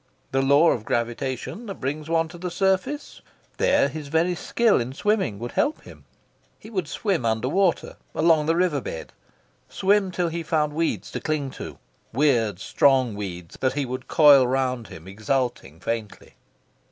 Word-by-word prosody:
The 135 - +2
law 140 +5 +5
of 110 - -2
gravitation 125 - -3
that 195 - -5
brings 150 +4 -4
one 165 0 +2
to 175 +1 -11
the 180 +1 -3
surface? 195 - -1 0.4
There - - +3
his 150 0 -7
very 160 +4 +1
skill 220 - +2
in 125 +2 -5
swimming 195 - 0
would 120 +3 -6
help 305 - 0
him. - - -14 0.5
He 220 - -13
would 185 -7 -2
swim 185 - -1
under 110 +1 0
water, 185 +3 +1 0.2
along 155 -2 +3
the 165 - +3
river 170 -5 +1
bed, 80 - -7 0.6
swim 195 0 +2
till 180 -1 -1
he 170 +1 -4
found 150 -2 0
weeds 165 +2 -2
to - - -4
cling 150 -4 -2
to, - - -8 0.3
weird 120 -7 +2
strong 130 +2 +3
weeds 90 -4 -7
that 130 -1 +1
he 145 0 -1
would 130 +1 -6
coil 145 -5 +6
round 130 -3 -1
him, 85 -3 -11
exulting 110 - -2
faintly... 110 +2 -5
145 Hz, 165 wpm, -24 LUFS, 120-175 Hz, 0.6 s, coil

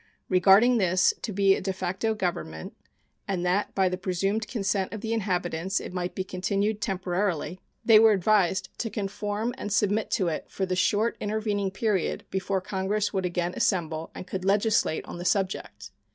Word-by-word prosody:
Regarding 195 +7 +5
this 185 -1 +3
to 225 - -4
be 195 0 +4
a - - -4
de 190 - -1
facto 190 +4 -2
government, 170 - -4 0.5
and 180 -2 -1
that 185 +3 0
by 190 -1 +3
the 180 0 -2
presumed 195 +4 -1
consent 195 -4 -1
of 215 - -6
the 225 0 -2
inhabitants 185 -3 -1
it - - -8
might 180 -1 -3
be 190 - -2
continued 200 +3 -1
temporarily, 185 -3 -1 0.3
they 225 -3 +8
were 225 0 +7
advised 190 -1 +2
to 225 - -2
conform 210 +2 -3
and 205 - -4
submit 210 +1 +1
to 190 -6 +1
it 160 - -3
for 190 - -2
the 185 -1 -1
short 210 +5 +1
intervening 205 -2 -1
period 195 -1 -1
before 190 0 -1
Congress 200 +3 -1
would 190 -2 0
again 175 0 -2
assemble 160 -3 0
and - - -7
could 185 0 -5
legislate 200 -3 +2
on - - -8
the - - -5
subject. 190 +1 -2
195 Hz, 175 wpm, -27 LUFS, 185-210 Hz, 0.5 s, they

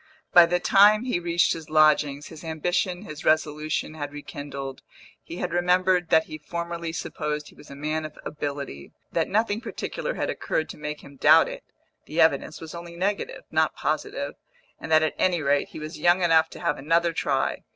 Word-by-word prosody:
By 175 -1 +9
the 175 +1 +1
time 210 +4 +5
he 245 -9 -1
reached 170 0 +2
his 160 -1 -8
lodgings, 150 -2 +3
his 160 -1 -11
ambition, 175 +3 -1
his 155 -7 -9
resolution, 155 0 0
had 145 -2 -5
rekindled; 145 -2 -7 0.4
he 170 - -9
had 180 - -3
remembered 180 0 +2
that 160 - +5
he 155 -1 -9
formerly 170 +1 -4
supposed 150 -2 -4
he - - -18
was - - -15
a 140 - -9
man 155 +2 -2
of 155 -1 -8
ability, 140 - -5 0.2
that - - 0
nothing 215 +1 +1
particular - - -4
had - - -1
occurred 155 - -2
to - - -8
make 150 0 -5
him 140 0 -14
doubt 155 +4 +6
it - - -7 0.4
(the - - -4
evidence - - +2
was 160 -1 -9
only 170 0 -8
negative, 200 - -2
not - - +2
positive), - - -2 0.5
and - - -7
that 155 0 +6
at 155 - 0
any 180 -2 +2
rate 140 0 +2
he - - -11
was 155 +2 -7
young 175 +1 +4
enough 160 -1 +4
to - - -11
have 170 - -1
another 165 +4 +2
try. 135 -4 -1
160 Hz, 190 wpm, -25 LUFS, 150-175 Hz, 0.5 s, By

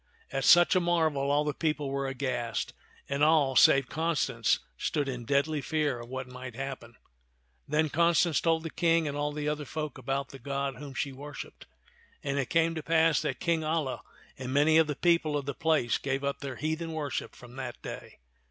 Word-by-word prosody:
At 135 -1 -1
such 175 +2 +7
a - - +5
marvel 160 -5 +1
all 145 +1 +3
the 150 -1 -1
people 150 -3 -1
were 140 0 -1
aghast, 130 -3 -2 0.3
and 140 +1 0
all 150 -4 +4
save 135 +1 +6
Constance 150 -9 +1 0.2
stood 145 - -1
in 125 -3 -4
deadly 140 +3 +1
fear 150 -3 -1
of 120 0 -10
what 130 0 -4
might 125 -1 -9
happen. 130 -3 -6 0.7
Then 155 +2 +2
Constance 170 +1 +3
told 165 -1 +2
the 165 - -5
King 165 -2 +2
and 145 - -3
all 145 0 -1
the 150 0 -4
other 150 0 -1
folk 150 +1 -5
about 135 +2 -2
the 135 - -11
God 140 +1 -3
whom 140 -3 -9
she 140 - -2
worshiped; 145 +2 -9 0.6
and 140 0 -1
it 135 - -2
came 165 0 +2
to 160 - -4
pass 160 -2 +3
that 125 - -3
King 170 -2 +1
Alia 155 -4 -1 0.4
and 130 -1 -4
many 150 +3 +5
of 160 - +4
the 150 - -2
people 165 -2 +2
of 140 - -4
the 140 - -3
place 160 -7 +1
gave 135 0 -2
up 140 0 -2
their 135 -2 -5
heathen 160 +3 -3
worship 145 -4 -4
from 125 -1 -13
that 135 - -6
day. - - -8
145 Hz, 200 wpm, -29 LUFS, 135-160 Hz, 0.7 s, such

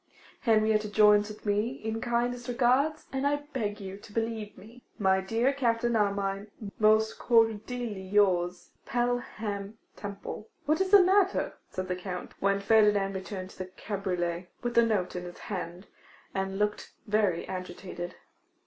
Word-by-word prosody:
'Henrietta 215 -2 +3
joins 210 0 +5
with 215 +1 -11
me 210 +2 +1
in 225 -3 -4
kindest 245 +1 -1
regards; 255 +5 +2
and 270 +1 +1
I 290 0 0
beg 210 -4 -2
you 195 -1 -7
to 205 - -14
believe 225 -1 -3
me, 235 +4 -14
'My 190 -3 +3
dear 230 +7 +1
Captain 240 -3 +1
Armine, 200 -1 0 0.3
'Most 215 0 +4
cordially 225 -1 +1
yours, 185 -2 +1 0.2
'Pelham 225 -4 -2 0.2
Temple.' 200 -1 -6
'Well, - - -11 0.2
what 310 +4 +2
is 385 - +1
the 400 -1 +8
matter?' 385 +1 +3 0.2
said 185 0 -4
the 180 - -1
Count, 180 0 -6
when 200 0 +2
Ferdinand 205 -1 +4
returned 190 0 -6
to - - -17
the 185 - -4
cabriolet, 180 -3 -3
with 240 0 -1
the 235 - +6
note 205 -6 0
in 180 - -3
his 175 - -9
hand, 175 +4 -6 0.5
and 195 0 -2
looking 210 0 0 0.2
very 205 -5 +1
agitated. 180 -1 -6
210 Hz, 150 wpm, -29 LUFS, 195-235 Hz, 0.5 s, the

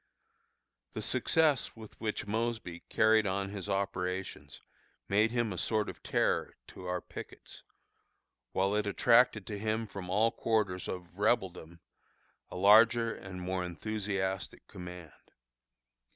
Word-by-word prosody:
The - - -4
success 155 -5 +2
with 110 -2 -13
which 110 -1 -2
Mosby 110 -5 -2
carried 110 -1 +4
on 100 +1 -1
his 100 0 -6
operations 95 -1 -3 0.5
made 105 +3 +3
him 120 -3 0
a 90 - -4
sort 110 -2 +1
of - - -9
terror - - 0
to 90 - -9
our 90 0 -1
pickets, - - -10 0.9
while 95 +1 +1
it 105 -1 0
attracted 115 0 +4
to 105 -1 -5
him 110 +1 -1
from 100 -3 -8
all 110 +5 +3
quarters 105 -7 0
of 90 +1 -7
Rebeldom 90 -6 0 0.7
a - - -9
larger 115 +4 +6
and 90 -2 -8
more 90 0 -1
enthusiastic 95 +1 -3
command. 90 -3 -9
100 Hz, 125 wpm, -32 LUFS, 90-110 Hz, 0.9 s, larger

